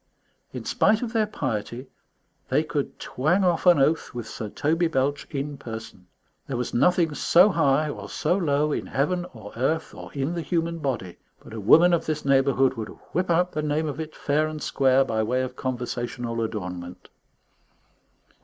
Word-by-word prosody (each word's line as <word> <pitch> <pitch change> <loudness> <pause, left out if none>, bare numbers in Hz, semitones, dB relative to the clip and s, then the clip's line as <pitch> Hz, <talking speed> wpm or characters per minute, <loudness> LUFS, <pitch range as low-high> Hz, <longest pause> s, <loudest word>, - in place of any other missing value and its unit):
In - - -7
spite 220 +3 +2
of 235 -1 -4
their 220 -2 +2
piety, 125 - -4 0.6
they 145 +4 +2
could 150 -2 -3
twang 165 +9 +1
off 175 0 +1
an 175 - +7
oath 145 0 +1
with 120 -2 -5
Sir 110 0 -6
Toby 165 +8 +1
Belch 145 -1 -1
in 140 0 -4
person. 110 -7 -8 0.4
There 130 - -3
was 125 - -3
nothing 170 +4 +3
so 180 +6 +5
high 155 -4 +2
or 105 -8 -6
so 175 - 0
low, 150 -5 +1
in - - -2
heaven 175 +6 -1
or 105 -2 -10
earth 155 +7 -1
or - - -10
in 140 +4 -2
the 170 - -2
human 165 +1 -1
body, 125 - -3 0.3
but - - -12
a 110 - -5
woman 170 - +6
of 170 - 0
this 155 -2 -2
neighbourhood 135 -1 +3
would 110 - -4 0.2
whip 180 +1 0
out 175 +1 +2
the 155 - -2
name 150 +1 0
of 145 +1 -5
it, 155 -1 -6
fair 150 +2 +1
and 155 -1 -6
square, 135 0 +3
by 110 -1 -1
way 125 +4 0
of 130 0 -5
conversational 120 -2 -3
adornment. 90 -5 -5
140 Hz, 180 wpm, -25 LUFS, 120-165 Hz, 0.6 s, an